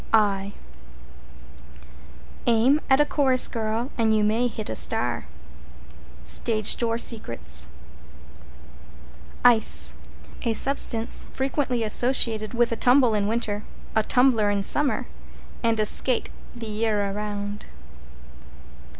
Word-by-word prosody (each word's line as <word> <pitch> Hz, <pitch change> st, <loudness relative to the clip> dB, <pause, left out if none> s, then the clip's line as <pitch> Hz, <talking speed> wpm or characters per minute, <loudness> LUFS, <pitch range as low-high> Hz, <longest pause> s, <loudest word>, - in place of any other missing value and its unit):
I 200 Hz, -2 st, +1 dB, 1.9 s
Aim 240 Hz, +6 st, +3 dB
at 265 Hz, +1 st, +4 dB
a 295 Hz, -, +4 dB
chorus 265 Hz, -4 st, +1 dB
girl 225 Hz, +3 st, -3 dB
and 220 Hz, -1 st, +2 dB
you 215 Hz, -, +1 dB
may 225 Hz, +4 st, +1 dB
hit 220 Hz, -2 st, -7 dB
a 110 Hz, -, -4 dB
star. 120 Hz, -5 st, 0 dB, 1.0 s
Stage 215 Hz, -, +3 dB
Door 230 Hz, -1 st, -1 dB
Secrets. 80 Hz, -, -1 dB, 1.8 s
=ICE= 75 Hz, -, +5 dB, 0.4 s
A 230 Hz, -, -1 dB
substance 235 Hz, -2 st, -1 dB
frequently 265 Hz, -3 st, -2 dB
associated 225 Hz, 0 st, +1 dB
with 240 Hz, 0 st, +1 dB
a -, -, -1 dB
tumble 245 Hz, -1 st, +4 dB
in 205 Hz, -1 st, 0 dB
winter, 215 Hz, -2 st, -3 dB, 0.3 s
a 220 Hz, -, +4 dB
tumbler 235 Hz, -2 st, +2 dB
in 200 Hz, -1 st, -1 dB
summer, 290 Hz, +6 st, +1 dB, 0.6 s
and 230 Hz, -2 st, 0 dB
a 215 Hz, -, +2 dB
skate 250 Hz, +3 st, +2 dB, 0.2 s
the 235 Hz, -1 st, -8 dB
year 210 Hz, -2 st, -1 dB
around. 205 Hz, 0 st, -6 dB
225 Hz, 110 wpm, -24 LUFS, 205-245 Hz, 1.9 s, =ICE=